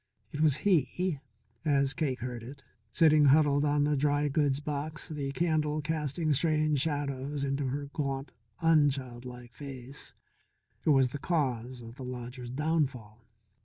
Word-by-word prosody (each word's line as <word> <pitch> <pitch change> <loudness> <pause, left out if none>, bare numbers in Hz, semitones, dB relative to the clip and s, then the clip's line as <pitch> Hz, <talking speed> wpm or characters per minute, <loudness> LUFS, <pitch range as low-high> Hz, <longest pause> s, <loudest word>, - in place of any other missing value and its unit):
It 150 - -3
was 155 -4 +5
he 180 -2 +2 0.4
as 140 -3 +2
Cake 135 -6 -2
heard 125 -1 -4
it, 135 +4 -10 0.3
sitting 155 -1 +5
huddled 145 0 +5
on 145 0 +2
the 150 - +1
old 145 - +1
dry 145 +1 +2
goods 145 -2 +1
box, 150 +1 -4
the 145 -3 -3
candle 155 -1 0
casting 155 0 -1
strange 155 0 +2
shadows 145 -1 -2
into 140 0 -1
her 140 +2 -2
gaunt, 135 -1 -3 0.3
unchildlike 125 -6 +1
face, 135 0 -8 0.7
who 155 - +5
was 135 -3 +4
the 145 - -6
cause 130 -7 -1
of 115 +2 -11
the 130 - -7
lodger's 125 0 -6
downfall. 130 -6 -2
145 Hz, 145 wpm, -30 LUFS, 130-150 Hz, 0.7 s, was